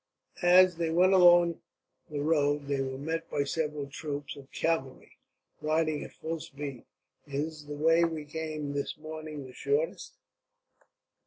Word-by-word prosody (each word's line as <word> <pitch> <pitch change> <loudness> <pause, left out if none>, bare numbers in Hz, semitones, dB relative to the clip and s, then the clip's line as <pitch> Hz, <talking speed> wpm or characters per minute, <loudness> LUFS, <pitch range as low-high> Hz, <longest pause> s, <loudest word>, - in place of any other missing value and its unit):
As 180 0 +6
they 165 -1 0
went 180 +4 +4
along 175 -2 +6 0.5
the 145 -2 -3
road 145 -2 +2
they 140 -1 -1
were 130 0 -3
met 165 +4 -3
by 145 - 0
several 150 0 -2
troops 145 0 -5
of 140 -1 -13
cavalry, 150 -6 -2 0.5
riding 155 0 +1
at - - -10
full 165 +1 -4
speed. 140 -4 -7 0.4
"Is 150 +2 -4
the 145 - -5
way 165 +3 +4
we 160 -3 -1
came 155 -1 -4
this 140 +1 -3
morning 155 -2 -7
the 130 - -11
shortest?" 445 - -1
155 Hz, 145 wpm, -30 LUFS, 145-165 Hz, 0.5 s, As